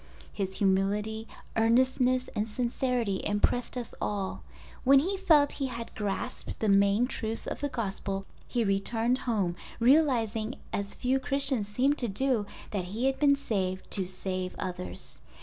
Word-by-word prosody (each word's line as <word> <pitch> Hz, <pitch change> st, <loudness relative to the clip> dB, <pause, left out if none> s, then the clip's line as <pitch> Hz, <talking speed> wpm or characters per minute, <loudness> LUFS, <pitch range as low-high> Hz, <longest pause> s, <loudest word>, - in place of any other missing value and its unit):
His 190 Hz, -2 st, -3 dB
humility, 205 Hz, +3 st, +1 dB, 0.3 s
earnestness, 255 Hz, +2 st, +3 dB
and 210 Hz, +1 st, 0 dB
sincerity 240 Hz, -3 st, -1 dB
impressed 220 Hz, +5 st, +1 dB
us 240 Hz, -2 st, -5 dB
all. 200 Hz, -2 st, -2 dB, 0.4 s
When 275 Hz, +2 st, +7 dB
he 360 Hz, +9 st, +2 dB
felt 320 Hz, -7 st, +4 dB
he 275 Hz, -, -2 dB
had 235 Hz, -2 st, -6 dB
grasped 205 Hz, -2 st, -4 dB
the 220 Hz, -, +1 dB
main 200 Hz, +3 st, +4 dB
truths 225 Hz, -3 st, -3 dB
of -, -, -4 dB
the 285 Hz, -, -1 dB
Gospel 195 Hz, -4 st, -3 dB, 0.2 s
he 240 Hz, -2 st, 0 dB
returned 225 Hz, +5 st, +1 dB
home 195 Hz, -6 st, +1 dB, 0.2 s
realizing 235 Hz, -4 st, +3 dB, 0.2 s
as 200 Hz, 0 st, -2 dB
few 260 Hz, +1 st, +1 dB
Christians 270 Hz, -6 st, +1 dB
seem 255 Hz, +7 st, +2 dB
to 245 Hz, -, 0 dB
do, 230 Hz, 0 st, 0 dB, 0.2 s
that 195 Hz, -4 st, -2 dB
he 215 Hz, +8 st, -2 dB
had 270 Hz, 0 st, +1 dB
been 285 Hz, -1 st, +5 dB
saved 190 Hz, -9 st, -2 dB
to 190 Hz, -3 st, -1 dB
save 185 Hz, 0 st, -4 dB
others. 95 Hz, -, -6 dB
225 Hz, 150 wpm, -29 LUFS, 200-255 Hz, 0.4 s, When